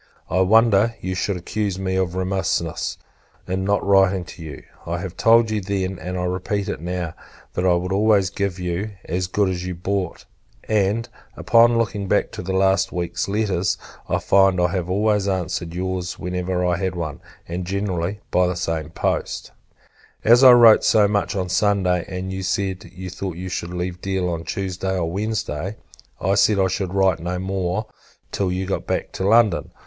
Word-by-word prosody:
I 90 - +2
wonder 110 +2 +4
you 95 - -3
should 95 +1 -1
accuse 100 +2 -3
me 95 -1 -2
of 95 -2 0
remissness, 95 -3 -1 0.5
in 95 +1 -1
not 100 +1 +1
writing 95 -1 +4
to 85 - -11
you. 75 -3 -8 0.2
I - - -2
told 115 -1 +4
you 105 -1 0
then, 95 -1 -2
and 90 0 -5
I 90 - -2
repeat 95 +3 -2
it - - -4
now, 90 -1 -3 0.4
that 90 - 0
I 90 - +5
would 90 +2 -2
always 100 -2 +3
give 100 -1 -2
you 90 +3 -3 0.2
"as 90 +1 -2
good 100 +2 +1
as 90 -1 -2
you 90 -1 -4
brought:" 95 0 -3 0.4
and, 110 +2 +1 0.3
upon 115 0 +5
looking 105 -3 -1
back - - +1
to - - -6
the 95 +2 -4
last 95 0 +2
week's 85 -1 -2
letters, 100 -2 0 0.3
I - - +2
find 95 -1 +3
I 90 -1 +3
have 90 0 -2
always 105 +1 +1
answered 90 -3 -2
your's, 90 0 -3
whenever 90 0 -2
I 90 0 +1
had 95 0 -2
one; 80 -4 -5 0.3
and, 90 +2 -4
generally, 95 0 -2
by 90 0 +3
the 90 - -1
same 80 -3 -2
post. - - -2 0.7
As 120 +4 +6
I 130 -1 +10
wrote 115 -3 +7
so 105 -2 +4
much 100 0 0
on 95 -2 -1
Sunday, 95 -2 +1
and 95 0 -5
you 95 - -4
said 95 0 -2
you 95 -1 -8
thought 90 -1 -5
you 95 +1 -5
should 85 0 -4
leave 90 0 -4
Deal 95 -2 -1
on 85 -1 -4
Tuesday 95 -1 -2
or 85 -2 -1
Wednesday, 100 -3 -3 0.4
I 95 - +1
said 105 +1 +4
I 95 -1 +2
should 95 -1 -2
write 95 -3 +3
no 90 +2 -3
more 95 +2 -2 0.5
till 95 -2 -1
you 95 +1 -2
got 95 - -3
back - - -2
to 95 - -2
London. 110 -4 +3
95 Hz, 185 wpm, -22 LUFS, 90-100 Hz, 0.7 s, I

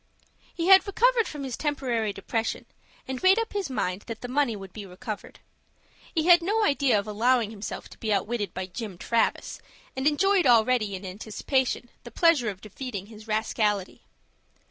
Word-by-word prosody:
He 335 - -3
had 385 +2 +7
recovered 465 +3 +3
from 295 -2 -6
his 260 -3 -4
temporary 255 -8 -1
depression, 225 +3 -3 0.4
and 260 -1 -4
made 375 +2 +6
up 455 0 -2
his 400 -6 -2
mind 185 -7 -2
that 230 -2 -6
the 245 - -5
money 255 -2 +1
would 195 -2 -10
be 215 - -7
recovered. 195 +3 -8 0.7
He 320 -1 +1
had 350 0 +7
no 425 +6 +1
idea 280 - +3
of 200 - -2
allowing 225 +1 +1
himself 210 -1 -6
to - - -15
be 220 - -2
outwitted 205 -1 -1
by 185 - -4
Jim 195 0 -7
Travis, 230 +5 0 0.4
and 265 +2 0
enjoyed 370 +3 +3
already, 230 -3 +3
in 190 +1 -8
anticipation, 230 +7 -2 0.2
the 240 - -9
pleasure 290 -3 +3
of 195 -2 -7
defeating 215 -2 -6
his 215 0 -13
rascality. 215 -2 -1
235 Hz, 170 wpm, -26 LUFS, 210-290 Hz, 0.7 s, had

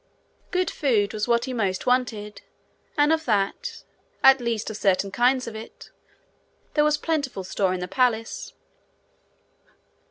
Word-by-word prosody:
Good 365 -1 0
food 220 -8 +1
was 215 +1 -2
what 235 0 +2
he 260 - -4
most 195 -6 -1
wanted 220 -5 0 0.6
and 295 +2 +4
of 320 0 -1
that, 220 - -1 0.4
at 270 -1 +7
least 230 -2 -2
of 215 - -6
certain 195 -1 +1
kinds 250 +4 +2
of 230 - -7
it, 220 +1 -10 0.8
there 300 - +3
was 300 0 +3
plentiful 285 - -2
store 190 0 0
in 185 -1 -2
the 180 - -3
palace. 245 - 0
235 Hz, 140 wpm, -24 LUFS, 205-270 Hz, 0.8 s, at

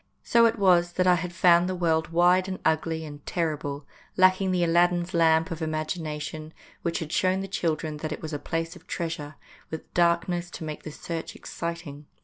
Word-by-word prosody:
So 235 -1 +5
it 225 - -1
was 175 -3 +4
that 185 - +1
I 180 - +6
had 175 0 -2
found 175 +1 +4
the 185 - -2
world 160 -3 +1
wide 180 +2 +3
and 190 -1 -4
ugly 160 0 0
and 145 -1 -10
terrible, 150 -4 -2 0.3
lacking 185 +1 +4
the 180 -1 +1
Aladdin's 175 +1 +2
lamp 165 +1 +3
of 165 - -4
imag 155 0 -2
ination, 155 0 -6 0.3
which 170 -1 -1
had 155 -2 -5
shown 185 +1 +2
the 195 - -5
children 160 -4 -2
that 155 +1 -5
it 155 - -4
was 155 0 -5
a 145 - -2
place 165 +3 -3
of 180 +1 -16
treasure, 160 -3 -4 0.3
with 160 - -8
darkness 175 0 +1
to 170 - -8
make 155 -1 -5
the 155 - -8
search 165 +2 -6
exciting. 170 -4 -6
170 Hz, 195 wpm, -26 LUFS, 155-180 Hz, 0.3 s, I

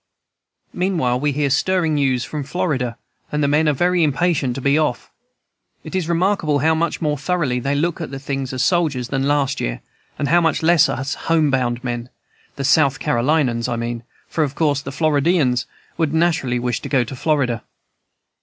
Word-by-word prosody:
Meanwhile 165 -10 0
we 145 +2 +1
hear 140 0 0
stirring 170 +2 +1
news 135 -4 +1
from 150 +2 -5
Florida, 135 -6 -2 0.3
and 150 0 0
the - - +3
men 150 +2 +3
are - - +2
very 175 +4 +2
impatient 145 -4 +1
to - - -4
be 140 +2 +2
off. 155 -5 -1 0.7
It - - -9
is 180 -3 -1
remarkable 170 -3 +1
how 160 +3 +2
much 165 +1 -1
more 150 -2 0
thoroughly 145 -5 0
they 140 +3 -1
look 165 +3 -1
at 160 - -4
things 135 -1 -4
as 130 -1 -1
soldiers 150 -9 +1
than 135 0 0
last 140 -2 +1
year, - - -2 0.4
and 140 - -1
how 175 +3 +4
much 160 -1 +1
less 170 -2 +5
as 135 +3 -2
home 160 -3 +1
bound 125 -2 0
men, 120 -1 -4 0.5
the 140 - -4
South 140 -1 +3
Carolinians, 120 -2 +1
I 120 - -1
mean, 115 0 -3 0.3
for 160 - 0
of 140 -1 -3
course 145 -4 +1
the 140 - -7
Floridians 145 -3 +1 0.3
would 160 -2 0
naturally 160 -7 +1
wish 120 -2 -1
to - - -6
go 130 -4 +3
to 120 +3 -7
Florida. 130 -5 0
145 Hz, 185 wpm, -20 LUFS, 130-160 Hz, 0.7 s, less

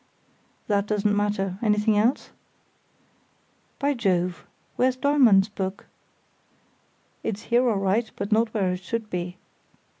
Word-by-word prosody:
"That 205 -1 0
doesn't 210 -1 +1
matter. 200 -2 -1
Anything 210 -1 +2
else?" 225 +6 +1 1.5
"By 285 +1 +1
Jove!—where's 195 +4 -1
Dollmann's 255 -8 +4
book?" 190 -2 -5 1.4
"It's 210 -1 -4
here 245 +1 +4
all 215 - +1
right, 200 +4 0
but 200 - -5
not 220 +1 +2
where 195 -5 0
it 180 0 -4
should 225 +1 -4
be." 180 0 -4
210 Hz, 115 wpm, -25 LUFS, 195-230 Hz, 1.5 s, Dollmann's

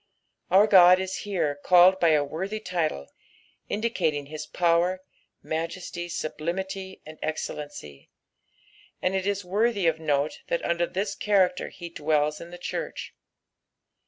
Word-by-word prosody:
Our 195 +3 +6
God 185 -3 +7
is 190 0 -3
here 155 -7 -1
called 185 +1 +6
by 170 - +4
a 150 -2 +4
worthy 190 +9 -4
title, 165 - -2 0.6
indicating 180 -10 -1
his 155 +2 -7
power, 175 +2 +1 0.4
majesty, 175 +2 -4
sublimity, 190 +5 -4
and 155 0 -11
excellency; 145 - -6 0.9
and 185 - 0
it 190 0 -1
is 200 -1 -1
worthy 205 +1 +1
of 160 -1 +2
note 145 -1 0
that 170 - -1
under 170 0 +1
this 200 +2 -2
character 190 -4 +1
lie 170 -1 -6
dwells 150 -1 0
in 170 - -9
the 175 - -9
church. 175 - -5
175 Hz, 130 wpm, -26 LUFS, 155-190 Hz, 0.9 s, God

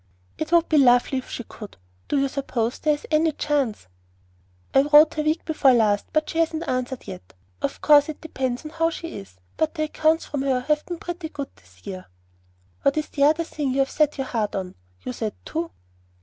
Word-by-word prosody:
"It 315 - -3
would 340 -1 +4
be 310 - +4
lovely 245 0 +4
if 255 - -11
she 240 - -5
could. 210 -2 -11 0.3
Do 290 - 0
you 275 0 +2
suppose 255 -4 -2
there 300 -1 +2
is 290 - -12
any 315 0 +3
chance?" 280 -8 -1 0.9
"I 270 - +6
wrote 295 +2 +6
her 305 - -1
week 310 +2 0
before 295 -4 +4
last, 210 -4 +2
but 310 0 +1
she 325 - -3
hasn't 325 0 0
answered 255 0 -2
yet. 90 +1 -10 0.3
Of - - -3
course 295 0 +6
it 310 - -6
depends 260 -4 -3
on 305 - -6
how 330 0 +1
she 335 0 -7
is; 95 -2 -10 0.2
but 315 +1 0
the 310 - 0
accounts 315 +1 +1
from 285 - -3
her 265 -2 +1
have 300 +3 0
been 350 - -4
pretty 345 -1 -6
good 280 -3 -7
this 90 0 -23
year." 185 -1 -7 0.7
"What 280 +2 +2
is 305 - -1
the 280 -1 +2
other 315 +3 +3
thing 290 -5 -3
you 270 - 0
have 270 - 0
set 300 -1 +1
your 270 - -2
heart 225 -5 -2
on? 185 -2 -4 0.3
You 125 - -4
said 215 - -4
'two.'" 330 +1 -3
290 Hz, 215 wpm, -24 LUFS, 250-315 Hz, 0.9 s, I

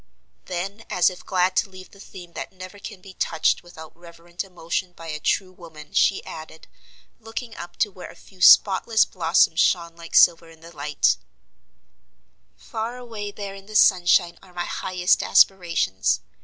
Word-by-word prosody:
Then, 195 +5 -5
as 180 +1 +3
if 180 - -12
glad 185 0 0
to 200 - +1
leave 185 -1 -13
the 200 - -18
theme 175 -3 -12
that - - -7
never 185 +1 -11
can 200 -2 -10
be 190 0 -13
touched 160 -3 0
without 160 -3 -13
reverent 170 +1 -9
emotion 180 -1 -4
by 165 -1 -10
a 150 -1 -4
true 185 +4 0
woman, 160 -4 -14
she 195 - +2
added, 160 0 -10 0.5
looking 225 +1 -7
up 175 0 -9
to 210 - +1
where 185 -1 -10
a - - -14
few 185 -2 -19
spotless 215 +4 +6
blossoms 165 -1 +2
shone 170 -2 +2
like 170 -1 -9
silver 165 -1 +5
in 160 -1 -18
the 170 +1 -14
light: 145 - +1 1.4
"Far 230 +2 -5
away 225 -4 -7
there 200 -1 -7
in 195 0 -13
the 215 - -10
sunshine 175 -3 +4
are 180 -2 -19
my 175 0 -3
highest 180 -1 0
aspirations. 165 - +2
180 Hz, 170 wpm, -23 LUFS, 170-195 Hz, 1.4 s, spotless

